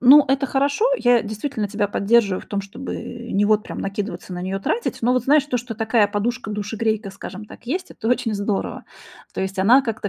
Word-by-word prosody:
Ну, 275 +4 +8
это 270 +1 +2
хорошо. 280 - +1
Я 245 -1 +4
действительно 215 +1 -3
тебя 205 0 -1
поддерживаю 200 -1 +2
в - - -16
том, 200 - -2
чтобы 200 +6 -6 0.4
не, 200 +1 +3
вот, 215 0 +3
прям - - -7
накидываться 195 -2 -4
на 180 - -5
неё, 190 +1 -2
тратить. 470 - -1
Но 245 +2 +3
вот 255 - +1
знаешь, 290 0 +5
то, 250 -4 0
что 240 -1 -5
такая 220 -1 +3
подушка-душегрейка, 210 -1 -2
скажем 195 +1 -8
так, 235 - -14
есть- 355 +9 -3
это 225 - -4
очень 230 -2 +1
здорово. 200 0 -2 0.5
То - - -3
есть 190 +1 -3
она 235 +8 +6
как-то 225 -4 -3
220 Hz, 200 wpm, -22 LUFS, 200-250 Hz, 0.5 s, Ну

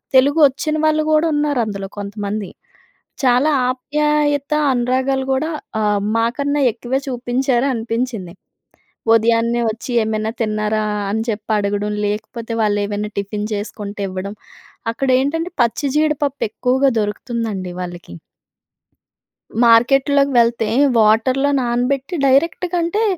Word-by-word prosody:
తెలుగొచ్చిన 285 +2 +4
వాళ్ళు 310 0 +2
కూడా 310 +1 +3
ఉన్నారందులో 235 -10 -1
కొంతమంది. 205 0 -4 0.8
చాలా 255 +4 +4 0.2
ఆప్యాయత, 290 +2 0 0.2
అనురాగాలు 260 +2 0
కూడా 305 +5 -1 0.3
ఆహ్, 210 -1 +1 0.2
మాకన్నా 280 +5 0
ఎక్కువే 245 +4 -2
చూపించారు 250 +1 0
అనిపించింది. 225 -5 -3 0.8
ఉదయాన్నే 230 +1 +2
ఒచ్చి, 230 +3 -8
"ఏమైనా 215 0 -2
తిన్నారా"? 215 0 0 0.3
అని 220 +2 -1
చెప్పి 215 0 -3
అడగడం. 205 +1 -1
లేకపోతే 230 +3 -4
వాళ్ళేమైనా 205 0 -1
టిఫిన్ 205 +2 -4
చేసుకుంటే 205 0 -5
ఇవ్వడం. 190 +2 -5 0.6
అక్కడేంటంటే 275 +7 0
పచ్చి 240 +4 +1
జీడిపప్పు 300 -2 0
ఎక్కువగా 265 +2 +2
దొరుకుతుందండి 210 -3 -3
వాళ్ళకీ. 175 - -8 1.5
మార్కెట్‌లోకి 275 +4 +4
వెళ్తే 230 -1 +2 0.3
వాటర్‌లో 235 +6 +3
నానబెట్టి 250 +6 -1
డైరెక్ట్‌గా 335 +6 +2
అంటే 345 +6 0
240 Hz, 100 wpm, -19 LUFS, 215-275 Hz, 1.5 s, తెలుగొచ్చిన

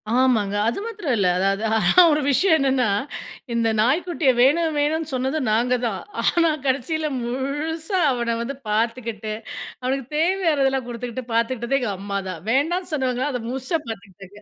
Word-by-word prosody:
ஆமாங்க. 235 -4 +2
அது 235 - -1
மாத்திரம் 405 - -2
இல்ல. 195 -3 +2
அதாவது, 195 +3 +1
ஆனா 220 - +6
ஒரு 300 0 +2
விஷயம் 320 +5 +4
என்னன்னா, 265 -3 +2 0.7
இந்த 230 -1 +1
நாய் 255 +9 +3
குட்டிய 335 -6 +1
வேணு, 275 +7 +5 0.2
வேணுனு 305 +1 0
சொன்னது 265 +4 -1
நாங்க 240 +3 +2
தான். 215 -5 -2 0.2
ஆனா, 335 -1 +3 0.2
கடசியில 290 +4 0
முழுசா 295 - -2
அவன 235 -2 -1
வந்து 265 +4 -4
பாத்துகிட்டு, 225 -1 -1 0.5
அவனுக்குத் 265 +1 -3
தேவையானதெல்லாம் 305 -7 +1
குடுத்துகிட்டு 245 +1 -5
பாத்துகிட்டது 235 +3 0
எங்க 240 -5 -2
அம்மா 200 0 -3
தான். 175 -4 -6
வேண்டானு 340 +8 0
சொன்னவங்க 260 -3 0
அத 250 -2 -3
முழுசா 265 +6 -1
பாத்துக்கிட்டாங்க. 200 -1 -10
255 Hz, 145 wpm, -22 LUFS, 230-300 Hz, 0.7 s, ஆனா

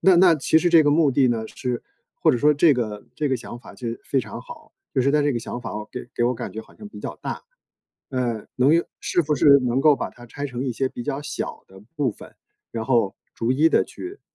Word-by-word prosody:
那 185 +1 +6
那 175 -1 +7
其 155 +2 +3
实 175 - +2
这 165 -2 +7
个 145 - +3
目 150 -1 +4
的 130 0 +3
呢 115 -2 -1
是 125 -2 -4 0.3
或 - - +3
者 125 - +1
说 150 +4 +5
这 155 +2 +5
个 110 -4 -3
这 150 - -1
个 130 - +1
想 120 0 -9
法 - - -13
就 120 - -5 0.2
非 135 - +1
常 - - -8
好， - - -13 0.2
就 - - +3
是 135 +2 +3
它 150 +1 +3
这 145 0 +2
个 120 - -1
想 120 - -6
法 115 -3 -6 0.2
给 125 - -7
给 120 - +1
我 125 +1 +2
感 - - -6
觉 110 - -5
好 - - -17
像 210 -1 -10
比 - - -11
较 - - -6
大。 - - -5 0.7
呃， 120 -4 -2
能 130 +4 +4
用 170 +1 +3 0.2
是 - - +1
不 150 -1 0
是 140 0 +7
能 125 +2 +1
够 150 0 +5
把 - - -4
它 120 - -14
拆 145 +4 -5
成 125 -1 -4
一 130 - -1
些 130 +3 -1
比 120 - -7
较 135 +4 -3
小 - - -5
的 95 0 -15 0.2
部 140 -6 +1
分， - - -14 0.3
然 115 -1 -4
后 115 -6 +1 0.2
逐 115 - -1
一 150 +5 +4
的 - - +3
去， 375 +4 -9
135 Hz, 275 characters per minute, -23 LUFS, 120-150 Hz, 0.7 s, 那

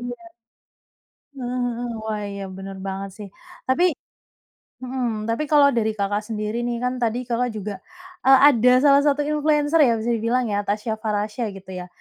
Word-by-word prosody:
iya. 245 +8 -7 1.1
Heeh 250 -1 -2
heeh. 245 0 -4 0.2
Wah, 215 -1 -3
iya 200 0 -6
bener 195 0 -8
banget 195 0 -4
sih 205 -1 -8 0.4
tapi 260 +7 +2 1.0
mhm, 245 -4 -3
tapi 265 +7 -1
kalau 290 -2 +6
dari 220 -2 +1
Kakak 205 +1 0
sendiri 215 +1 -3
nih. 240 -1 -2
Kan 250 0 -1
tadi 235 +2 0
Kakak 245 0 0
juga, 210 -1 -5 0.5
eee, 270 0 +8
ada 250 -1 +4
salah 285 -1 +6
satu 290 0 +2
influencer 300 +1 +2
ya 235 - +3
bisa 225 +2 -2
dibilang 235 +3 0
ya 205 0 0
Tasya 215 +2 -1
Farahsya 215 +1 -2
gitu 190 -1 -12
ya. 180 -1 -6
235 Hz, 165 wpm, -22 LUFS, 210-255 Hz, 1.1 s, eee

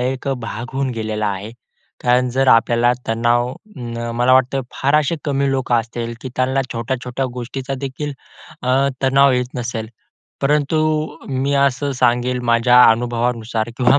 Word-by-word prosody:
एक 130 +2 -2
भाग 115 +2 -6
होऊन 135 -1 -1
गेलेला 110 -1 -2
आहे. 100 +2 -4 0.5
कारण 125 +1 +3
जर 135 +1 +1
आपल्याला 120 +1 +4
तणाव 120 +2 +1 0.6
मला 125 +2 +3
वाटतं 130 +1 +3
फार 140 +2 0
असे 155 +2 0
कमी 140 -1 0
लोकं 130 -2 0
असतील, 115 0 -2
की 130 - -6
त्यांना 130 +1 +1
छोट्या-छोट्या 125 +2 -3
गोष्टीचादेखील 135 +3 -5 0.5
अ, 130 +2 +2
तणाव 135 +1 +5
येत 125 0 -1
नसेल. 115 -3 -4 0.5
परंतु 150 +2 +2 0.5
मी 135 +1 0
असं 140 0 +1
सांगेल 125 0 +1
माझ्या 125 +1 +6
अनुभवानुसार 120 -1 -1
किंवा 125 +2 +4
125 Hz, 135 wpm, -19 LUFS, 120-135 Hz, 0.6 s, माझ्या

